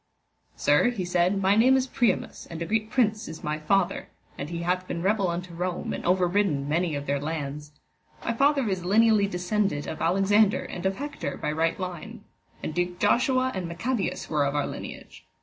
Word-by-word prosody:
Sir, 245 - +3
he 210 -7 -3
said, 180 +2 +2
my 195 +2 +4
name 255 +5 +5
is 260 - +1
Priamus, 250 -2 -1
and 165 - -7
a 170 - -2
great 215 +3 -1
prince 215 -3 +1
is 160 0 -9
my 150 0 -2
father, 190 +4 0 0.3
and 140 - -6
he 170 0 -4
hath 180 +1 -1
been 170 - -4
rebel 200 0 +2
unto 175 +1 -4
Rome 180 +1 -3
and - - -5
overridden 180 -5 +2
many 165 +1 0
of 140 0 -4
their 140 0 0
lands. 150 -1 -5 0.5
My 235 - 0
father 275 0 +2
is 190 -3 -1
lineally 210 +2 +4
descended 180 -4 -1
of 160 - -6
Alexander 195 +4 +3
and 180 +2 -3
of 190 - -1
Hector 290 +4 -5
by 150 - -2
right 165 +3 0
line. 180 -3 -6 0.4
And - - -3
Duke 175 +1 -1
Joshua 255 +6 +2
and 185 -3 -3
Maccabaeus 195 +7 -2
were 150 -2 +1
of 140 +1 -1
our 145 - +1
lineage. - - -8
180 Hz, 190 wpm, -26 LUFS, 165-215 Hz, 0.5 s, name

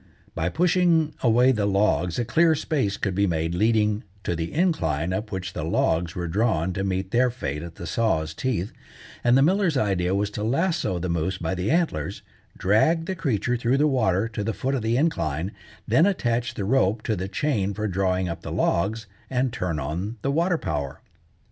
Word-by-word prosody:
By 80 +1 -1
pushing 170 - +2
away 125 +2 +4
the 105 -5 0
logs 95 -4 +1
a 120 - 0
clear 165 +6 +3
space 135 -10 -1
could 100 - -1
be 100 +2 +2
made 80 -1 -1
leading 105 +2 +2 0.2
to 85 - -1
the 80 0 -3
incline 90 - 0
up 110 +3 -3
which 95 -2 -4
the 75 - -4
logs 85 +1 0
were 90 -1 -3
drawn 95 -2 0
to 95 - -2
meet 95 0 -2
their 125 +1 +3
fate 75 - -4
at 85 0 -8
the - - -8
saw's 80 -9 0
teeth, 105 -1 -2 0.5
and 120 +1 +5
the 135 - +5
miller's 180 -2 +2
idea 95 -5 +1
was 100 +1 0
to 105 - -4
lasso 135 - 0
the 90 +1 -3
moose 85 +2 -1
by 85 0 -2
the 90 +1 -2
antlers, 160 - -1 0.3
drag 160 - +2
the 190 - -2
creature 125 - -1
through 120 +3 +1
the 150 - +3
water 110 -7 +1
to 105 -2 -4
the 115 +2 -1
foot 135 +2 -2
of 135 - 0
the 115 +2 +1
incline, 95 - 0 0.4
then 130 - +4
attach 120 -11 -1
the 100 - -3
rope 110 -2 +2
to 110 - 0
the 95 0 -3
chain 100 -2 0
for 105 +2 -3
drawing 95 -1 0
up 85 - -5
the - - -7
logs, 105 +6 0 0.2
and 125 -1 0
turn 90 -7 -2
on 85 - -4
the 140 - +1
water 170 +4 +2
power. 75 - -4
105 Hz, 200 wpm, -24 LUFS, 90-130 Hz, 0.5 s, and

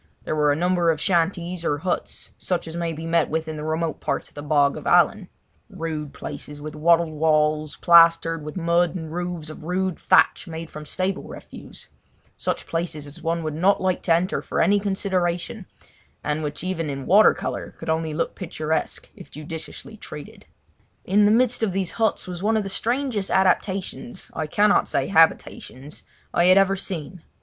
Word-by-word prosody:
There - - -2
were 150 -1 +3
a - - +2
number 175 +1 +1
of 160 -2 +1
shanties 175 0 0
or 145 - 0
huts, 175 +4 -4
such 180 -3 -3
as 160 - -7
may 170 -1 -2
be 160 +1 -6
met 165 -1 +1
with 160 +1 -2
in 155 - -5
the 150 - -6
remote 160 +1 -2
parts - - -3
of - - -29
the 145 - -7
Bog 145 -1 +2
of 155 - -7
Allan—rude 175 -4 -1
places 145 0 -8
with 150 +1 -7
wattled 165 +1 +3
walls, 155 -1 +1
plastered 165 -1 +5
with 150 +4 -7
mud 170 0 +1
and 160 -3 -6
roofs 175 -3 -4
of 155 - -11
rude 185 +1 -2
thatch - - +3
made 165 0 -7
from 150 0 -9
stable 185 +4 -2
refuse—such - - -8
places 165 -3 -3
as 145 0 -12
one 165 0 -1
would 155 -1 -3
not 185 +6 +2
like 185 -1 0
to 170 - +2
enter 180 +3 -1
for - - -3
any 205 +1 +4
consideration, 190 0 -2 0.6
and 150 +1 -1
which 150 +1 -5
even 165 -4 -2
in 135 -1 -5
water 210 +3 +6
colour - - -5
could - - -9
only 160 0 0
look 155 +2 -2
picturesque 160 -4 -3
if - - -13
judiciously 155 +2 -8
treated. - - -11 0.6
In 205 +2 +4
the 205 - +5
midst 245 +1 +3
of 215 -5 0
these 190 -2 -1
huts 220 -2 0
was 180 -1 -6
one 220 +2 +2
of 215 - 0
the 195 - -5
strangest 235 -1 -1
adaptations—I 190 -1 -1
cannot 205 +6 +3
say - - -1
habitations—I 160 -1 0
had 185 +1 +6
ever 195 0 +4
seen. 180 -2 -6
170 Hz, 175 wpm, -23 LUFS, 155-185 Hz, 0.6 s, water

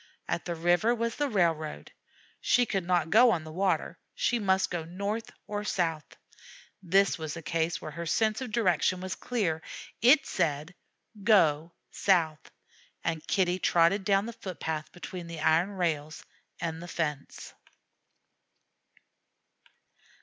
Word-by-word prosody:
At - - -2
the 175 - -3
river 175 +8 +2
was 230 0 -2
the 290 -1 0
railroad. 165 -7 -1 0.5
She 245 0 +3
could 195 -6 -2
not 175 -3 +1
go 240 +4 +7
on 170 -8 +1
the 155 - -9
water; 190 +3 -1 0.2
she 240 - +1
must 190 -2 +1
go 175 -2 -2
north 200 +7 -4 0.2
or 205 0 -4
south. 165 -7 -2 0.6
This 195 +1 +2
was 155 +1 -5
a 165 - -8
case 165 0 -1
where 155 - -7
her 170 +2 -6
sense 220 +7 +1
of 255 -4 -5
direction 185 -4 +2
was 185 0 -4
clear; 185 -10 -2 0.4
it 275 +5 +6
said, 155 -1 -1 0.5
"Go 165 -6 +3 0.2
south," 165 -6 +1 0.5
and 160 -1 -3
Kitty 185 -1 +1
trotted 175 +3 +3
down 200 0 +2
the 235 - -6
foot 190 -6 -8
path 155 -1 -3
between 175 0 -8
the 165 -2 -7
iron 160 +4 +3
rails 160 -5 -3 0.3
and 165 -1 -4
the 175 - -8
fence. 150 -5 -4
175 Hz, 140 wpm, -29 LUFS, 160-205 Hz, 0.6 s, go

